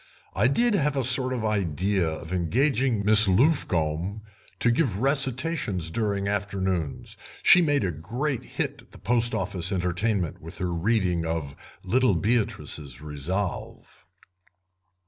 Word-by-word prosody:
I - - +2
did 235 - +2
have 150 -7 +1
a 135 - +1
sort 130 +1 +3
of 120 -4 -3
idea 95 -2 0
of 80 +2 -7
engaging 120 - +1
Miss 105 0 +8
Luffcombe 95 - +1 0.4
to 120 - +3
give 120 - 0
recitations 130 - 0
during 100 -1 -1
afternoons; 95 -6 -3 0.3
she 180 - +7
made 145 -7 +1
a 90 - -1
great 120 - -3
hit - - -5
at - - -25
the - - -12
Post 120 0 0
Office 90 0 -1
entertainment 90 0 -1
with 80 +3 -11
her 90 -3 -2
rendering 90 -1 0
of 80 -4 -4 0.3
'Little 125 -4 +2
Beatrice's 85 - -2
Resolve'." 75 +6 -5
100 Hz, 130 wpm, -25 LUFS, 85-125 Hz, 0.4 s, Miss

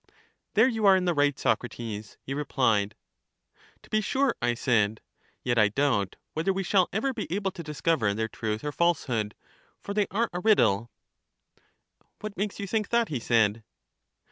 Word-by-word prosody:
There 220 +4 +6
you 225 -5 +1
are 195 - +8
in 185 - -1
the 175 - +2
right, 145 -2 +2
Socrates, 110 -4 -3
he 135 - -4
repKed. 115 -8 +1 0.9
To - - -18
be 215 - +2
sure, 265 +4 +1
I 120 0 +1
said; 110 -4 +1 0.4
yet 120 -2 +1
I 105 - +6
doubt 105 -5 0 0.2
whether 165 +5 0
we 195 0 -2
shall 185 0 +3
ever 260 +7 0
be 215 -8 -5
able 195 +1 -1
to 170 - -8
discover 150 -7 0
their 110 +1 -1
truth 110 0 -4
or 150 - -2
falsehood; 125 -11 0 0.4
for 200 - -6
they 205 -1 +1
are 230 +4 0
a 175 - -2
riddle. 115 - +3 1.3
What 215 -1 -6
makes 205 0 -3
you 200 - -3
think 215 +1 -1
that? 235 -1 +2
he 140 - -2
said. 110 -2 +2
150 Hz, 170 wpm, -27 LUFS, -, 1.3 s, are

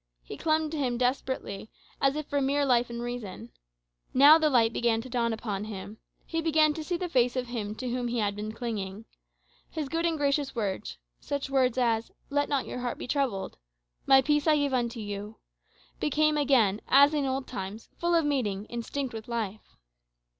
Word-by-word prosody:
He - - -8
clung 315 -1 0
to 320 - -3
him 250 -3 0
desperately, 250 -4 -2 0.3
as 275 0 +3
if 305 -1 -3
for 285 0 -1
mere 280 +1 +2
life 245 -2 +3
and 235 0 -5
reason. 230 - -6 0.6
Now 290 +5 +8
the 310 -1 +3
light 230 -4 +3
began 235 -2 +1
to 255 +1 -11
dawn 235 -1 +1
upon 210 -2 -3
him. 210 0 -8 0.3
He 330 0 -2
began 310 -1 +3
to 315 - -5
see 350 +2 -2
the 360 0 -3
face 250 -6 +2
of 255 -1 -1
Him 215 -4 -4
to 255 +3 -5
whom 245 0 -1
he 240 0 -2
had 205 -2 0
been 210 +1 -4
clinging. 220 -3 -5 0.6
His 305 -4 -4
good 330 +2 0
and 330 -1 0
gracious 280 -1 0
words 190 - -3 0.2
such 280 -1 -4
words 255 -2 +2
as, 230 -2 +1 0.2
"Let 285 0 +1
not 280 -2 0
your - - -5
heart 245 -1 -3
be - - -7
troubled," 250 -8 -1 0.5
"My 270 0 +7
peace 295 +2 +1
I 310 - +6
give 285 -2 0
unto 235 -2 -1
you" 205 +1 -6 0.6
became 305 +1 +2
again, 250 -8 +3
as 280 +3 +6
in 290 -3 0
old 265 0 -2
times, 215 -2 -6
full 345 0 +2
of 330 -2 +3
meaning, 215 -9 -1
instinct 240 +2 -4
with 220 -1 -7
life. 220 -3 -5
250 Hz, 195 wpm, -28 LUFS, 225-285 Hz, 0.6 s, Now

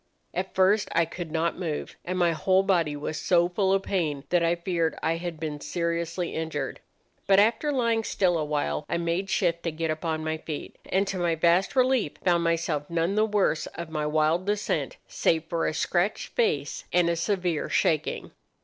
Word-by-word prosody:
At 185 +2 -3
first 200 +3 +3
I 170 0 +3
could 170 0 -7
not 165 +2 0
move, 160 -5 -4
and 185 +1 -3
my 175 -2 +3
whole 185 +4 +2
body 170 -6 +1
was 150 +1 -4
so 175 -1 +3
full 190 +2 0
of 195 0 +2
pain 155 -9 -1
that 175 -1 +3
I 170 +1 +2
feared 170 -2 -1
I 165 +1 +1
had 170 -2 -5
been 150 -2 -4
seriously 170 0 -2
injured. 160 -4 -3 0.5
But, 195 0 +6
after 230 +8 +3
lying 230 -4 +1
still 185 -4 +1
awhile, 150 - -1
I - - 0
made 170 +3 -1
shift 170 -4 +1
to 165 - -2
get 160 0 -2
upon 155 0 -2
my 160 0 -2
feet, 155 -2 -6
and 195 +2 +2
to 195 -1 -3
my 170 -2 +1
vast 170 - +2
relief 255 - +2
found 175 -2 +3
myself 165 -3 0
none 170 +2 0
the 215 +1 +2
worse 205 -7 +1
of 170 -1 -6
my 150 -1 -1
wild 155 +4 +1
descent, 210 - -1
save 160 -1 +1
for 165 0 -1
a - - +1
scratched 180 +5 0
face 145 -11 0
and 175 -1 +3
a 170 - +2
severe 180 -3 -1
shaking. 155 -2 0
170 Hz, 190 wpm, -27 LUFS, 160-190 Hz, 0.5 s, But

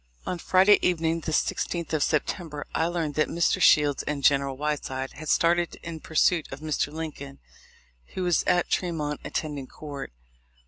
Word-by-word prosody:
On 180 - -3
Friday 190 +4 +5
evening, 165 -2 +1
the 160 - -4
16th 170 +2 -1
of 155 - +1
September, 155 0 -1
I 160 - +1
learned 170 -4 -2
that 155 +2 +1
Mr. 170 0 +1
Shields 145 -2 +5
and 145 -2 -4
General 140 -1 +3
Whiteside 135 -3 -3
had 155 0 -8
started 170 0 +2
in 165 -1 -6
pursuit 160 +1 +1
of 135 - -7
Mr. 150 -1 -1
Lincoln, 150 -3 -7 0.8
who 185 - -2
was 175 -2 +2
at 175 -1 +2
Tre 180 - 0
mont, 150 -3 -3
attending 145 -4 -4
court. 145 - -8
155 Hz, 165 wpm, -26 LUFS, 145-170 Hz, 0.8 s, Friday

